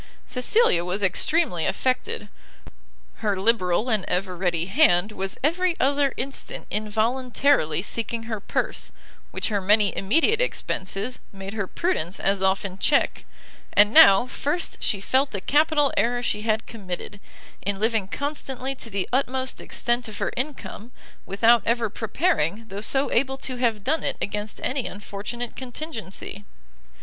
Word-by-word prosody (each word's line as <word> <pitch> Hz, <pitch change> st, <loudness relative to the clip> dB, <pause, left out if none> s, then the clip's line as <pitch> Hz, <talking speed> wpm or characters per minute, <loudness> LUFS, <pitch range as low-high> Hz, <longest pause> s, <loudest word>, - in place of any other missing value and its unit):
Cecilia 250 Hz, -, +2 dB
was 185 Hz, +3 st, -2 dB
extremely 190 Hz, -, +1 dB
affected; 265 Hz, -, -1 dB, 0.9 s
her 205 Hz, -4 st, -1 dB
liberal 195 Hz, 0 st, +2 dB
and 215 Hz, -5 st, +1 dB
ever 185 Hz, 0 st, -1 dB
ready 175 Hz, -2 st, 0 dB
hand 195 Hz, -, +3 dB
was 195 Hz, -1 st, -2 dB
every 345 Hz, +3 st, +2 dB
other 280 Hz, +1 st, +2 dB
instant 270 Hz, +2 st, -4 dB
involuntarily 220 Hz, -, +1 dB
seeking 230 Hz, +1 st, -3 dB
her 225 Hz, -2 st, -4 dB
purse, -, -, -2 dB, 0.4 s
which -, -, -1 dB
her 205 Hz, -2 st, 0 dB
many 205 Hz, +1 st, +4 dB
immediate 325 Hz, -, +2 dB
expences, 215 Hz, -, -2 dB
made 195 Hz, 0 st, -8 dB
her 200 Hz, -3 st, -2 dB
prudence 195 Hz, -, -1 dB
as 195 Hz, 0 st, +1 dB
often 190 Hz, 0 st, 0 dB
check: 280 Hz, +7 st, +2 dB, 0.5 s
and 205 Hz, +2 st, +5 dB
now 195 Hz, +3 st, +8 dB
first 295 Hz, +6 st, -2 dB
she 200 Hz, -, 0 dB
felt 265 Hz, +7 st, +1 dB
the 200 Hz, -, -4 dB
capital 295 Hz, +4 st, +2 dB
error 245 Hz, +1 st, +1 dB
she 210 Hz, -3 st, 0 dB
had 220 Hz, 0 st, 0 dB
committed, 200 Hz, -1 st, -6 dB, 0.4 s
in 200 Hz, 0 st, -2 dB
living 220 Hz, -2 st, +1 dB
constantly 270 Hz, +1 st, -3 dB
to 250 Hz, -3 st, -7 dB
the 195 Hz, -3 st, -2 dB
utmost 260 Hz, 0 st, -1 dB
extent 240 Hz, 0 st, -1 dB
of 215 Hz, -, -8 dB
her -, -, -1 dB
income, 250 Hz, -3 st, -5 dB, 0.4 s
without 225 Hz, +4 st, +4 dB
ever 230 Hz, -2 st, 0 dB
preparing, 225 Hz, -, 0 dB
though 195 Hz, +1 st, -5 dB
so 270 Hz, +5 st, +1 dB
able 265 Hz, +2 st, +1 dB
to 260 Hz, -1 st, -4 dB
have 230 Hz, -4 st, 0 dB
done 315 Hz, +7 st, +1 dB
it, -, -, -2 dB
against 210 Hz, +1 st, -3 dB
any 260 Hz, -1 st, -1 dB
unfortunate 205 Hz, +4 st, -6 dB
contingency. 245 Hz, -, -6 dB
225 Hz, 140 wpm, -24 LUFS, 195-265 Hz, 0.9 s, now